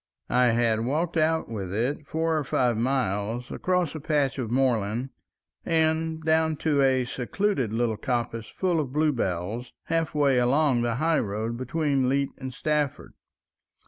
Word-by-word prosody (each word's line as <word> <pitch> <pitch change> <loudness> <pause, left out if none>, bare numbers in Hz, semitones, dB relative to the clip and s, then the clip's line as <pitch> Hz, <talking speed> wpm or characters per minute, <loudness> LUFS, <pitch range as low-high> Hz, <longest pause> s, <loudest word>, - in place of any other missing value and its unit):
I 125 0 +4
had 115 -1 +2
walked 160 +8 -1
out 160 0 +2
with 100 -5 -5
it 120 +9 -1
four 160 +1 0
or 155 - 0
five 125 -3 +1
miles 115 -1 -1
across 180 -4 0
a 155 - -5
patch 145 -3 0
of 120 -4 -3
moorland 120 -1 0 0.5
and 160 0 +1
down 160 0 +2
to 145 -3 +3
a 130 -2 +3
secluded 130 - -1
little 115 -1 0
coppice 115 -3 -2
full 180 -3 0
of 135 -4 -3
blue 155 +1 +3
bells, 105 0 -3
halfway 150 -5 +1
along 130 0 +3
the 120 -1 0
high 160 +5 +2
road 110 +3 -2
between 135 +1 0
Leet 140 +1 +1
and 130 -1 -5
Stafford. 150 0 -2
130 Hz, 150 wpm, -26 LUFS, 120-155 Hz, 0.5 s, I